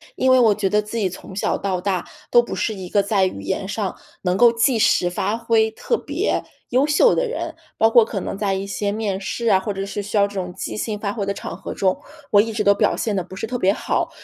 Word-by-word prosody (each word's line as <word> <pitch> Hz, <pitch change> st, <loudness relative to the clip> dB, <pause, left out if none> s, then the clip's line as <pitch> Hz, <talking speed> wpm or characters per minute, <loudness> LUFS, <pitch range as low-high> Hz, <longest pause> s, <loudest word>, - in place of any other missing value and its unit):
因 260 Hz, 0 st, +2 dB
为 255 Hz, -, +6 dB
我 220 Hz, -4 st, +5 dB
觉 200 Hz, -1 st, 0 dB
得 210 Hz, +2 st, +2 dB
自 210 Hz, +2 st, -6 dB
己 200 Hz, -4 st, +1 dB
从 185 Hz, +1 st, -10 dB
小 195 Hz, -, 0 dB
到 190 Hz, -2 st, -2 dB
大 185 Hz, -1 st, -1 dB, 0.3 s
都 240 Hz, -, +7 dB
不 240 Hz, -, -6 dB
是 220 Hz, -, -1 dB
一 190 Hz, -3 st, -8 dB
个 200 Hz, +1 st, +2 dB
在 200 Hz, -2 st, +2 dB
语 185 Hz, -, -4 dB
言 100 Hz, -, -3 dB
上 205 Hz, -1 st, -3 dB, 0.3 s
能 180 Hz, -1 st, +1 dB
够 240 Hz, -1 st, +7 dB
即 230 Hz, +1 st, +2 dB
时 175 Hz, -4 st, +3 dB
发 205 Hz, +5 st, -1 dB
挥 225 Hz, -1 st, +2 dB
特 475 Hz, -, -1 dB
别 -, -, -1 dB, 0.3 s
优 260 Hz, +4 st, +3 dB
秀 305 Hz, +11 st, +4 dB
的 -, -, +1 dB
人， 465 Hz, -, -4 dB, 0.2 s
包 225 Hz, -, +4 dB
括 235 Hz, 0 st, +7 dB
可 215 Hz, -2 st, -4 dB
能 190 Hz, -, -4 dB
在 200 Hz, -1 st, 0 dB
一 190 Hz, +1 st, -3 dB
些 200 Hz, +1 st, -2 dB
面 205 Hz, -2 st, -2 dB
试 230 Hz, +4 st, -3 dB
啊， 190 Hz, -, +5 dB
或 200 Hz, +2 st, -3 dB
者 195 Hz, 0 st, -4 dB
是 200 Hz, +1 st, -4 dB
需 205 Hz, +2 st, -3 dB
要 200 Hz, 0 st, +4 dB
这 205 Hz, -, -12 dB
种 180 Hz, -2 st, -3 dB
即 -, -, -5 dB
兴 215 Hz, 0 st, -2 dB
发 205 Hz, -1 st, -3 dB
挥 210 Hz, -, -3 dB
的 200 Hz, -, -1 dB
场 170 Hz, -, -6 dB
合 190 Hz, -, -7 dB
中， 195 Hz, +8 st, +1 dB, 0.3 s
我 205 Hz, -, +7 dB
一 225 Hz, +2 st, -3 dB
直 215 Hz, -1 st, -1 dB
都 200 Hz, -, +5 dB
表 -, -, +1 dB
现 215 Hz, -3 st, -1 dB
得 185 Hz, -, -1 dB
不 185 Hz, +2 st, -11 dB
是 190 Hz, -, -4 dB
特 245 Hz, +2 st, -4 dB
别 190 Hz, -1 st, +3 dB
好。 -, -, -1 dB
205 Hz, 290 characters per minute, -21 LUFS, 195-225 Hz, 0.3 s, 都